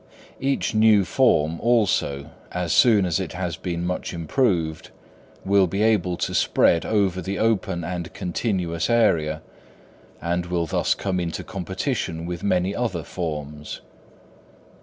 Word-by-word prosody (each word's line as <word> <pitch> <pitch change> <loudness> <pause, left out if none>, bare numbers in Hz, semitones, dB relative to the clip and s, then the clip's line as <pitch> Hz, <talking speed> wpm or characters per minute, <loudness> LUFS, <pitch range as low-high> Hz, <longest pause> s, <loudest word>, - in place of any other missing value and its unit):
Each 135 -3 0
new 110 -2 +5
form, 85 - +2
also, 95 -11 +1 0.2
as 90 -2 -1
soon 105 +3 +5
as 90 0 0
it 95 -5 -4
has 90 -3 -3
been 85 0 -4
much 90 0 -3
improved, 85 - 0 0.6
will 100 -1 +4
be 100 +5 -1
able 90 -6 +2
to - - -2
spread 85 - +3
over 95 -4 +1
the 95 +3 -3
open 95 -6 0
and 85 0 -4
continuous 90 -3 -2
area, 80 -10 +2 0.8
and 85 +1 -2
will 85 -1 0
thus - - +1
come 95 -2 -2
into 85 -2 -3
competition 95 - -3
with 85 -1 -5
many 95 -1 +1
other 100 -10 -2
forms. 75 -4 -5
90 Hz, 135 wpm, -23 LUFS, 85-100 Hz, 0.8 s, new